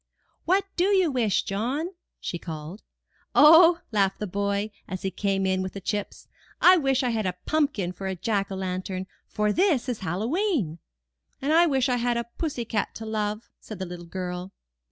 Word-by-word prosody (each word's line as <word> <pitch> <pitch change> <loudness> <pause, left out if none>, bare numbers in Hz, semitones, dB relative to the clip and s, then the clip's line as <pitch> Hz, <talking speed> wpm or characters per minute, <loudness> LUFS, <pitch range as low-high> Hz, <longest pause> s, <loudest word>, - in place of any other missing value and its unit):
*'What 380 +3 +3
do 355 - +2
you 380 -5 +3
wish, 235 -6 +1
John?'' 250 - -2 0.3
she 175 - -4
called. 160 +4 -7 0.5
0h," 330 +3 +8
laughed 195 -3 +2
the 210 - -3
boy, 200 +2 -1 0.2
as 185 0 -6
he 190 - -1
came 195 +1 0
in 190 0 +1
with 185 -1 -4
the 195 - -6
chips. 205 +2 -4 0.3
I 365 - +8
wish 270 -5 +1
I 250 - +1
had 220 -4 -1
a 180 0 -3
pumpkin 285 - 0
for 190 +1 -6
a 190 - -2
jack 200 +2 -1
o' - - -3
lantern, 185 0 -3 0.2
for 210 0 0
this 335 -9 +2
is 245 -3 -2
Hallowe'en." 215 - -1 0.6
And 285 +3 0
I 340 +2 +6
wish 265 -4 +2
I 250 -1 +1
had 240 0 0
a 235 - 0 0.2
pussy 285 -8 -2
cat 215 -2 -2
to 225 - -7
love," 215 0 -2
said 215 - -9
the 190 - -4
little 175 -1 -8
girl. 180 +1 -5
210 Hz, 190 wpm, -26 LUFS, 190-275 Hz, 0.6 s, 0h